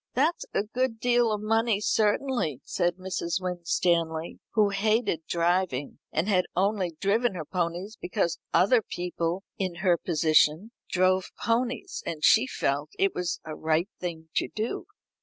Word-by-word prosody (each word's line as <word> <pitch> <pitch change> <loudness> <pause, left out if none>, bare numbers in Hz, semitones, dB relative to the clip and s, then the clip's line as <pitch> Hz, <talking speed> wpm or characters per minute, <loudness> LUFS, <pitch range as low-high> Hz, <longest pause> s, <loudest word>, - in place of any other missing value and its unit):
"That's 305 +7 +1
a - - +2
good 230 +1 -2
deal 240 -1 +3
of 210 -1 -1
money 225 -1 +2
certainly," 210 - +1
said 175 -1 0
Mrs. 185 -2 -2
Winstanley, 170 -2 0 0.2
who 210 -2 +4
hated 200 -4 0
driving, 170 -5 0
and 160 +5 0
had 185 -4 +2
only 185 -3 0
driven 215 +2 +1
her 160 -3 -5
ponies 180 +5 -3
because 170 -1 -1
other 225 +6 +4
people 175 -1 -3 0.2
in 185 -3 -1
her 175 -2 +4
position 160 +4 +3 0.2
drove 185 0 +2
ponies, 240 +2 -1
and 155 -2 -5
she 230 +4 +6
felt 145 - -1
it 195 0 +2
was 180 -1 -2
a 155 - -5
right 160 +4 0
thing 160 -3 -5
to - - +2
do. 220 +2 -4
185 Hz, 145 wpm, -27 LUFS, 170-215 Hz, 0.2 s, she